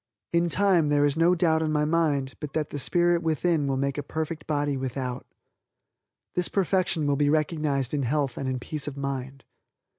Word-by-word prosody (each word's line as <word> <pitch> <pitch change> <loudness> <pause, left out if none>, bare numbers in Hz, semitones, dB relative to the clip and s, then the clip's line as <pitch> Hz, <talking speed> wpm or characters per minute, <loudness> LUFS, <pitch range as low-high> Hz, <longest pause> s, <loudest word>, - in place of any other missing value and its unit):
In 170 0 +2
time 180 -4 +3
there 145 0 +3
is 145 -1 +1
no 170 +2 +4
doubt 160 -2 +2
in 155 -1 0
my 150 0 +1
mind 150 -4 +1
but 150 -2 -6
that 155 -2 -2
the 145 - -4
spirit 175 +3 +2
within 160 -1 +1
will 135 -1 0
make 140 +1 -1
a - - -1
perfect 155 +1 -5
body 145 -2 0
without. 130 -1 -4 1.1
This 180 -1 +1
perfection 185 -4 +1
will 145 -1 +1
be 145 0 +2
recognized 150 -4 0
in 145 - 0
health 135 0 0
and 135 - -3
in 130 - -1
peace 150 +4 -4
of 140 -1 -5
mind. 135 -1 -4
150 Hz, 190 wpm, -26 LUFS, 140-165 Hz, 1.1 s, no